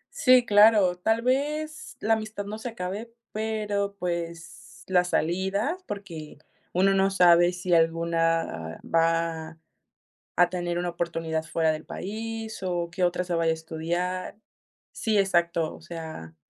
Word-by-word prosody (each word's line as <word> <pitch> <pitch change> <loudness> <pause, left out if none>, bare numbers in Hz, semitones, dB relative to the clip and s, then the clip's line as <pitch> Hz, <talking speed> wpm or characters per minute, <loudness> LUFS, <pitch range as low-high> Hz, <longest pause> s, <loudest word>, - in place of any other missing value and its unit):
Sí, 255 -1 +5
claro, 205 -4 +6
tal 220 +5 +1
vez 300 +5 -1
la 225 - +2
amistad 215 -2 -3
no 210 +2 -5
se 230 +3 -5
acabe, 215 +2 -5 0.2
pero, 210 -2 -2
pues, 170 -1 -5
la 180 -1 +4
salida 190 - 0
porque 170 - -7 0.4
uno 195 +2 +4
no 195 0 +3
sabe 175 -2 +6
si 180 0 -2
alguna 165 - +1
va 165 -1 0 0.8
a 175 0 +5
tener 175 -1 -2
una 175 0 -1
oportunidad 165 -2 -2
fuera 160 0 +1
del 155 0 -5
país, 220 +2 -5
o 175 -2 -1
que 185 +2 -2
otra 180 0 +1
se 175 -1 -2
vaya 165 -1 +2
a - - +2
estudiar 175 +4 -3 0.5
Sí, 220 -2 0
exacto, 170 -4 +1
o - - -15
sea, 160 - -8
180 Hz, 140 wpm, -26 LUFS, 165-205 Hz, 0.8 s, claro